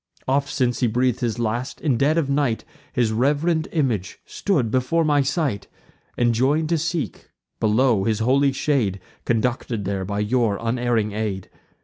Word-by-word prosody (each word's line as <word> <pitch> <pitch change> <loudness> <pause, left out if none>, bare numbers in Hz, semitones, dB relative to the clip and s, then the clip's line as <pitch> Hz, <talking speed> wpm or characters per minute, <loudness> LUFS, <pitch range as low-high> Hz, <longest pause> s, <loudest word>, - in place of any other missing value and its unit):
Oft, 140 +2 +1
since 125 -2 0
he 125 - +2
breath'd 125 +1 +1
his 120 -2 -1
last, 120 +2 -2
in 145 -6 +1
dead 145 +6 +2
of 160 -4 +1
night 140 -5 0 0.3
His 120 -3 +1
reverend 150 +7 +1
image 120 - -1
stood 140 - -1
before 130 +7 +1
my 145 -2 +3
sight; 135 - -1 0.5
Enjoin'd 130 +7 +2
to 165 -2 +2
seek, 165 0 -3 0.3
below, 110 -2 +2
his 110 -2 +1
holy 135 +5 +3
shade; 130 -8 0 0.3
Conducted 115 -2 -1
there 95 0 -2
by 100 +2 -2
your 110 -1 +1
unerring 115 -2 0
aid. 105 -3 -4
125 Hz, 150 wpm, -22 LUFS, 110-140 Hz, 0.5 s, my